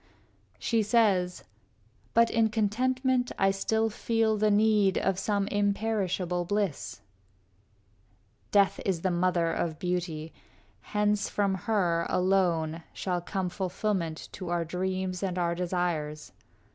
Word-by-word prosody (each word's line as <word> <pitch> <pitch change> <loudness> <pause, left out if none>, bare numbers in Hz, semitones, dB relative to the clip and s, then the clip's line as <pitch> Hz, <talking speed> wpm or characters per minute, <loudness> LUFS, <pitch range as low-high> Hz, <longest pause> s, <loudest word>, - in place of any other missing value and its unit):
V - - -32 0.5
She 230 -1 +1
says, 200 -5 +2 0.7
"But 230 0 +5
in 225 -1 +3
contentment 250 +4 +1
I 195 0 +3
still 220 +3 0
feel 225 0 +1
The 215 0 +2
need 210 -2 +3
of 190 -1 0
some 200 0 0
imperishable 200 -4 0
bliss." 195 - -2 1.5
Death 200 -1 +3
is 185 -4 -1
the 185 - +1
mother 175 -1 +1
of 160 -2 -2
beauty; 170 -3 -3 0.6
hence 210 -1 +2
from 200 -2 +1
her, 180 -4 0
Alone, 175 -4 +1
shall 180 -2 -2
come 190 +1 -2
fulfillment 185 -3 -2
to 185 -3 -7
our 175 -1 0
dreams 185 +1 -2
And 185 -2 -2
our 170 -1 +1
desires. 170 -4 -2
190 Hz, 120 wpm, -28 LUFS, 175-210 Hz, 1.5 s, But